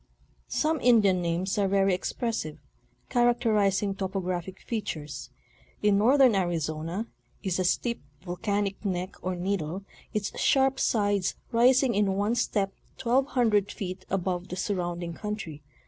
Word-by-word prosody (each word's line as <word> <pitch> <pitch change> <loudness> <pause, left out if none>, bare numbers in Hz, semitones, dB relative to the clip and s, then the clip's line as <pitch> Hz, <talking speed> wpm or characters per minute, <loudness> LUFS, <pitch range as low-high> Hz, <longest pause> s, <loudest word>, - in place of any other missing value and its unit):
Some 315 0 +1
Indian 210 -7 +5
names 175 +4 -1
are 200 - +3
very 195 0 +3
expressive, 180 -4 -2 0.5
characterizing 215 -5 +2
topo 195 0 -3
graphic 185 0 -4
features. 155 -10 -5 0.5
In 205 -1 +4
northern 255 +2 +6
Arizona 170 +1 -1 0.4
is 190 -2 0
a - - +2
steep 235 +6 0 0.2
volcanic 200 +2 -2
neck 185 -2 -2
or 185 0 -2
needle, 180 -1 -2 0.3
its 210 -3 -2
sharp 270 0 +3
sides 205 -4 +1 0.2
rising 250 +2 +4
in 200 -2 +2
one 205 +3 +1
step 205 -5 0 0.2
twelve 265 +1 +2
hundred 215 -7 +2
feet 185 -1 -5
above 185 -1 -1
the - - -5
surrounding 175 -3 -2
country. 205 -6 -5
195 Hz, 130 wpm, -28 LUFS, 180-225 Hz, 0.5 s, northern